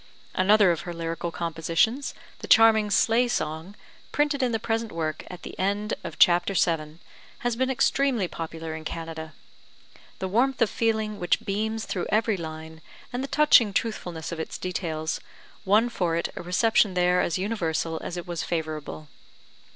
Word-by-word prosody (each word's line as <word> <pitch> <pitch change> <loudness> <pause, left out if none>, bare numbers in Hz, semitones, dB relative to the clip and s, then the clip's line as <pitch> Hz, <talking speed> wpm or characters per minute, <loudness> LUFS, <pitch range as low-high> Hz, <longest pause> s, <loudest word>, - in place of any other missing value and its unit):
Another 200 0 +5
of 165 - -2
her 175 -1 -6
lyrical 165 +1 -3
compositions, 170 - 0 0.2
the - - -7
charming 220 -2 +6
Sleigh 230 +4 +3
Song, 160 -2 -3 0.4
printed 290 -1 +1
in 250 -2 +1
the 225 - +1
present 225 0 -2
work 155 -2 -3
[at 180 -1 -9
the - - -7
end 205 +3 0
of - - -7
chapter 175 +1 +4
VII], 160 -3 0 0.4
has 245 -3 0
been 260 +2 0
extremely 265 -5 +2
popular 165 -1 -6
in 160 0 -7
Canada. 160 -1 -6 0.8
The 190 - -3
warmth 255 +7 +1
of 230 -4 +2
feeling 220 -2 0
which 180 +5 0
beams 220 +2 -2
through 180 - -3
every 220 0 +2
line, 160 -2 -8 0.3
and 250 +2 -2
the - - -3
touching 275 -9 +5
truthfulness 180 -8 -3
of 170 - -5
its 160 - -4
details, 165 -3 -3 0.5
won 210 +5 +4
for 175 -8 -1
it 170 - -1
a - - -5
reception 190 +2 +2
there 180 0 +3
as 170 - 0
universal 170 -5 -2
as 180 - -5
it 175 - -5
was 175 -2 -4
favourable. 155 -2 -4
185 Hz, 165 wpm, -26 LUFS, 165-225 Hz, 0.8 s, charming